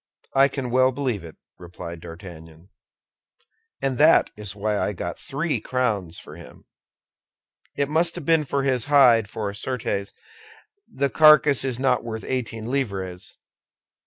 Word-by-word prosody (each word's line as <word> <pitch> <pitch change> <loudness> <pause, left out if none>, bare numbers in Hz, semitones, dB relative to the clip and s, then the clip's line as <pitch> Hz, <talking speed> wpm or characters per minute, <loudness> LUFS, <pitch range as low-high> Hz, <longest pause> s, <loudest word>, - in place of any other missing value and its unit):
"I 135 +1 +5
can 135 -3 -5
well 130 +1 +4
believe 125 -8 -3
it," 80 -2 -11 0.2
replied 85 -1 -9
D'Artagnan, 85 0 -12 1.1
"and 135 -1 -1
that 155 +2 +5
was 105 -2 -7
why 105 0 -1
I 105 - -1
got 85 -1 -6
three 150 +3 -2
crowns 105 -10 -2
for - - -12
him. - - -14 1.1
It 140 0 0
must 165 +3 +1
have 175 -5 -7
been 165 -1 +3
for 140 0 -1
his 130 -4 0
hide, 125 -7 +5
for, 105 -1 -4
certes, 100 -3 -3 0.8
the 140 0 -1
carcass 150 -3 +6
is 130 -3 -3
not 130 -1 +1
worth 110 -2 -6
eighteen 115 -4 -4
livres. 95 -9 -4
125 Hz, 140 wpm, -23 LUFS, 100-135 Hz, 1.1 s, carcass